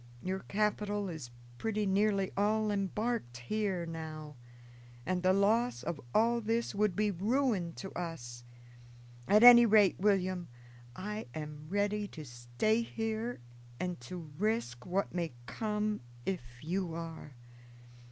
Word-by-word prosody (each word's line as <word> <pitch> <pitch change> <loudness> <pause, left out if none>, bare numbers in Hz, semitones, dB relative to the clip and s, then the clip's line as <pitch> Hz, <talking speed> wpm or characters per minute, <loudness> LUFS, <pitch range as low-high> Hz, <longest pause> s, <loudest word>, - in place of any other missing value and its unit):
Your 190 +1 -1
capital 205 0 -1
is 155 -8 -6 0.3
pretty 215 -1 0
nearly 195 0 +2
all 215 +1 +2
embarked 205 - -1
here 185 - -1
now, 155 -2 -7 0.7
and 185 0 0
the 185 +1 +4
loss 200 - +2
of 165 -1 -3
all 235 - +3
this 230 +2 0
would 205 -2 +1
be 210 0 +2
ruin 205 -2 +1
to 195 - -7
us. 120 -9 -6 0.8
At 210 +3 +6
any 240 -1 +11
rate, 210 -3 +5
William, 185 -3 +1 0.5
I 210 0 -5
am 150 -1 -6
ready 205 +1 0
to 155 - -6
stay 120 - 0
here 225 - -3 0.4
and 180 -7 -3
to 160 +5 -8
risk 210 - -1
what 190 +2 -1
may 170 -5 -2
come 210 - -2 0.2
if 190 -3 -1 0.2
you 175 0 -2
are. 165 -4 -7
195 Hz, 130 wpm, -33 LUFS, 165-215 Hz, 0.8 s, any